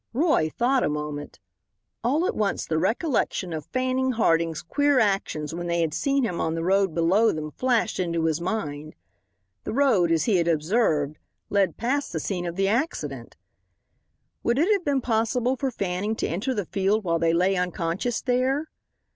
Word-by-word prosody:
Roy 275 - +2
thought 250 - +1
a - - +1
moment. 150 -1 -5 0.6
All 290 +9 +2
at - - -1
once 205 -2 -1
the 160 -1 0
recollection 210 - 0
of 155 -2 -5
Fanning 255 0 0
Harding's 165 -7 +1
queer 285 - +2
actions 195 -8 0
when 175 +1 -4
they 170 0 +1
had 160 -2 0
seen 275 - +1
him 180 -7 -1
on 160 0 -1
the 165 - -2
road 190 -1 +2
below 185 +7 +3
them 155 -1 -5
flashed 240 -2 0
into 170 -2 0
his 160 0 0
mind. 155 -6 -4 0.7
The - - -4
road, 230 -11 +3
as 165 -1 +2
he 215 -5 +2
had 170 -1 +1
observed, 155 -3 +1 0.3
led 195 -5 +2
past 265 +2 -1
the 160 - -1
scene 175 +1 -3
of 170 - -4
the 195 +1 +1
accident. 240 +11 -2 1.0
Would 235 +1 +1
it 335 +9 +3
have 395 -3 0
been 280 -3 +1
possible 235 +2 +1
for 270 0 -1
Fanning 200 -1 -2
to - - -2
enter 220 +10 -2
the 205 -3 -2
field 200 +5 0
while 170 -2 0
they 165 0 +2
lay 180 +3 +2
unconscious 180 +5 -2
there? 265 +4 0
195 Hz, 180 wpm, -25 LUFS, 165-250 Hz, 1.0 s, below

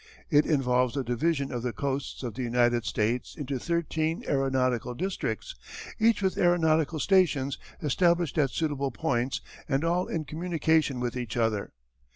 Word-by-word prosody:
It 145 0 +5
involves 125 -4 +2
the 135 - 0
division 135 +4 0
of 120 -2 -3
the 120 -1 -2
coasts 140 -1 -3
of 120 -3 -4
the 130 - -5
United 120 -1 +2
States 115 +4 -1
into 140 -4 -3
thirteen 165 0 -1
aeronautical 130 -3 0
districts, 195 - -3 0.5
each 225 -2 +3
with 190 - 0
aeronautical 160 -3 +3
stations 150 -8 +2 0.2
established 170 +1 +2
at 140 -3 +3
suitable 145 -2 -1
points 130 -2 -1 0.3
and 135 +2 +1
all 175 +2 +1
in 160 -2 -3
communication 160 -4 0
with 125 0 -2
each 120 -2 -4
other. 110 -3 0
140 Hz, 150 wpm, -28 LUFS, 125-165 Hz, 0.5 s, It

